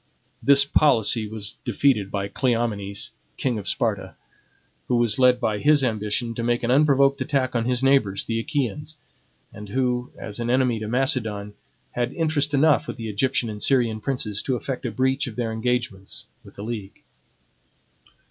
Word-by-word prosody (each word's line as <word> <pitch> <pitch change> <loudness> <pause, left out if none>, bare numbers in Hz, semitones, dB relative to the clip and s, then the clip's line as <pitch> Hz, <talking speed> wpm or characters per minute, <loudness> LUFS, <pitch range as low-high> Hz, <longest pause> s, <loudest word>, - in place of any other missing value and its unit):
This 140 0 +6
policy 115 -6 +3
was 105 -1 -6
defeated 110 -9 +1
by 100 0 -2
Cleomenes, 110 -4 -2 0.3
king 120 -4 -1
of 100 - -7
Sparta, - - -1 0.7
who 125 - +1
was 120 -1 +2
led 125 -1 +5
by 105 -4 -1
his 145 +1 +4
ambition 110 0 -1
to 115 - -4
make 120 +1 0
an 120 - +1
unprovoked 140 0 +4
attack 130 -2 0
on 115 -1 +1
his 125 +1 0
neighbors, 125 -8 +2
the 115 0 -1
Achaeans, 145 +3 -3 0.6
and 105 -1 -10
who, 125 +1 -1
as 105 +1 -7
an 120 0 -2
enemy 125 -2 +2
to 110 - -5
Macedon, 110 -5 -1 0.4
had 120 +1 -2
interest 150 -3 0
enough 150 +1 +3
with - - -6
the 115 -2 -5
Egyptian 120 +3 0
and 105 -1 -6
Syrian 120 -5 +2
princes 105 -5 -2
to 130 - -1
effect 125 0 -4
a - - -3
breach 130 +4 0
of 115 - -7
their 120 -2 -2
engagements 110 -4 -3 0.2
with - - -15
the 100 - -7
league. 105 -3 -7
120 Hz, 165 wpm, -23 LUFS, 110-135 Hz, 0.7 s, This